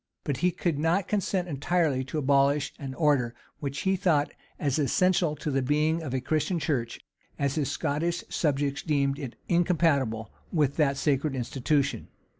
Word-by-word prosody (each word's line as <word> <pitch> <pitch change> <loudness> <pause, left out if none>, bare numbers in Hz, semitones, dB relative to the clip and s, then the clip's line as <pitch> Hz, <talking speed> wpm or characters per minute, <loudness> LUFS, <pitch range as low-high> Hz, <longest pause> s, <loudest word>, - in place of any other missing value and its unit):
But 140 -3 -2
he 180 - +2
could 170 -4 -1
not 170 +5 +1
consent 195 -3 0
entirely 150 -2 0
to 135 - -5
abolish 140 0 +2
an 135 -2 -6
order 135 -7 +2 0.2
which 140 0 -4
he 190 0 +2
thought 165 -6 +2 0.3
as 145 0 0
essential 170 +3 +2
to 150 - -4
the 135 0 +1
being 150 +5 +1
of 150 -5 -5
a 130 - 0
Christian 155 +6 0
church, 130 -8 -2 0.4
as 140 -1 0
his 145 -3 -1
Scottish 160 +4 -1
subjects 140 -2 0
deemed 140 -3 0
it 130 -5 -6
incompatible 155 - +1 0.2
with 145 -4 +1
that 140 -3 +2
sacred 140 0 +1
institution. 135 +3 -1
145 Hz, 160 wpm, -27 LUFS, 135-165 Hz, 0.4 s, he